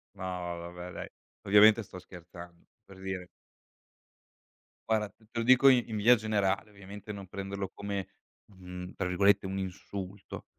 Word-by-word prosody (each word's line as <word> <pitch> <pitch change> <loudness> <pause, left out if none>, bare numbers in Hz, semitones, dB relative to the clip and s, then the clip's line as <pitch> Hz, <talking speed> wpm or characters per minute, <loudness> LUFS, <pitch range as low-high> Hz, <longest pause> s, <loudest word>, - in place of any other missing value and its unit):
No 95 - -8
ma 90 -1 -3
vabbè 90 +1 -8
dai. - - -7 0.3
Ovviamente 105 +3 +7
sto 95 - -10
scherzando. 85 -1 -12 0.2
Per 95 -1 -14
dire 95 -1 -5 1.6
Guarda, 110 -1 +2
t 110 - -26
te 115 - -3
lo 115 - -1
dico 130 +2 +7
i 125 -2 +4
in 110 - -2
via 115 +4 +7
generale, 105 -2 0
ovviamente 100 +1 -9
non 100 -1 -8
prenderlo 100 0 -4
come, 100 -2 -4 0.4
mhmm, 90 -1 -9
tra 95 - -1
virgolette, 100 +2 +4
un 95 +1 -3
"insulto", 95 +1 -6
95 Hz, 155 wpm, -30 LUFS, 90-105 Hz, 1.6 s, Ovviamente